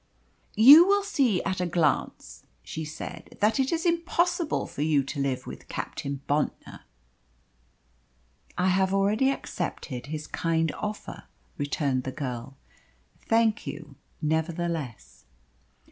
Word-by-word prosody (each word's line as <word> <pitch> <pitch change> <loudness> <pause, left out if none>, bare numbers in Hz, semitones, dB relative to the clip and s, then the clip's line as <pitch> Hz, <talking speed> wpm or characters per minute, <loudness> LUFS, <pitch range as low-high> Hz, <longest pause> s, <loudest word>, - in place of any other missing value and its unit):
"You 285 - +10
will 405 0 +3
see 250 - +1
at 185 -1 -2
a 180 - 0
glance," 165 -4 -1 0.2
she 160 - -5
said, 155 +1 -8
"that 215 +6 +2
it 265 0 +1
is 335 0 -1
impossible 340 0 +1
for - - -7
you 150 -2 +3
to 140 +2 -6
live 135 -2 -1
with - - -9
Captain 140 -1 -5
Bontnor." 145 +1 -2 1.8
"I 180 +1 +2
have 190 +1 +2
already 210 +7 +2
accepted 130 - -4
his 155 0 -5
kind 165 0 0
offer," 210 0 -6 0.3
returned 145 -2 0
the 130 - -4
girl. 130 -1 -6 0.7
"Thank 225 -1 +2
you, 150 -2 -7 0.3
nevertheless." 160 - -3
165 Hz, 120 wpm, -27 LUFS, 145-225 Hz, 1.8 s, You